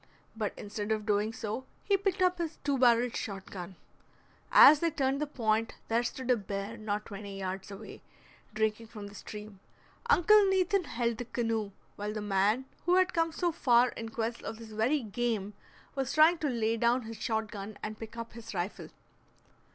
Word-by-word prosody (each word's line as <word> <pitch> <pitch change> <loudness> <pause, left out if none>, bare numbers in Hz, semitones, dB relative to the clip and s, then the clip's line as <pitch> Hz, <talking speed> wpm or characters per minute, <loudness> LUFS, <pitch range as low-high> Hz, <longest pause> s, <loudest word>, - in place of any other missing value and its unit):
But 215 -2 -2
instead 205 +1 -4
of 215 -1 0
doing 210 0 +1
so 225 +1 -4 0.2
he 400 - +3
picked 390 -1 0
up 365 -1 +2
his 330 -2 -3
two 285 -1 +1
barreled 240 -1 +4
shot 195 -2 -5
gun. 185 0 -7 0.8
As 295 +1 +9
they 335 - +2
turned 275 -2 0
the 300 - 0
point, 225 -4 0
there 230 +1 +3
stood 255 +1 -2
a - - +6
bear 200 0 -4
not 210 -1 -3
twenty 200 -1 -7
yards 190 0 -4
away, 205 +2 -9 0.5
drinking 220 +1 -1
from 210 -2 -9
the 200 - -10
stream. 210 -1 -9 0.5
Uncle 425 0 +6
Nathan 380 -1 +2
held 235 -4 -1
the 245 - -3
canoe, 225 -3 -1 0.3
while 210 +1 -3
the 215 - -3
man 210 +4 +1 0.2
who 355 - +5
had 370 0 +3
come 330 -1 +1
so 345 +2 0
far 250 -6 +4
in 225 -1 -6
quest 230 +1 -3
of 225 - -6
this 225 -1 -11
very 240 +7 +1
game 215 -2 -2 0.4
was 270 -2 -2
trying 320 +2 +6
to 300 - 0
lay 230 -2 0
down 235 +2 +2
his 225 0 -7
shot 220 -1 -1
gun 205 +1 -7
and 215 0 -5
pick 225 +1 -8
up 230 0 -6
his 225 -2 -9
rifle. 180 +3 -3
225 Hz, 190 wpm, -31 LUFS, 210-265 Hz, 0.8 s, As